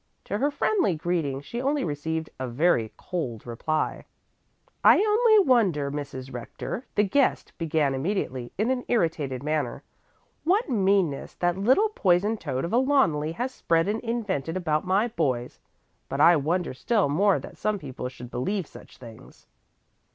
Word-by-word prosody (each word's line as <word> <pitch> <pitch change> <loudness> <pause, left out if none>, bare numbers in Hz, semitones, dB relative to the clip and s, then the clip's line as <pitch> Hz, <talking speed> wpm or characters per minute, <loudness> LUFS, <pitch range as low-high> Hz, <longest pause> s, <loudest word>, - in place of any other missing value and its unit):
To 205 - -3
her 285 - +2
friendly 295 - +1
greeting 155 -4 -2
she 235 +12 -5
only 280 +2 0
received 160 +1 -3
a 130 - -3
very 120 -3 +1
cold 130 -12 -4
reply. 140 +7 -2 0.8
"I - - +8
only 430 -2 +4
wonder, 185 - +3
Mrs. 140 -2 -6
Rector," 125 - -6
the 205 - +4
guest 260 +7 +1
began 155 -4 +1
immediately 135 -5 -2
in 220 +6 +1
an 250 -1 -1
irritated 155 - 0
manner, 150 -5 -2 0.6
"what 390 +8 +2
meanness 195 - +1
that 175 -1 0
little 260 - +3
poison 200 - +2
toad 130 -8 -3
of 170 - -5
a - - +4
Loneli 165 - +2
has 250 +8 -3
spread 165 -5 +1
and 215 +2 0
invented 205 - -2
about 160 -1 -1
my 195 +5 +2
boys. 130 - -2 0.5
But 135 - -3
I 170 +3 +7
wonder 165 +2 -1
still 210 - +1
more 190 +7 +3
that - - -10
some 215 -1 0
people 130 -6 -6
should 125 -1 -11
believe 185 +10 -2
such - - -15
things." 115 -3 -14
170 Hz, 155 wpm, -26 LUFS, 140-220 Hz, 0.8 s, I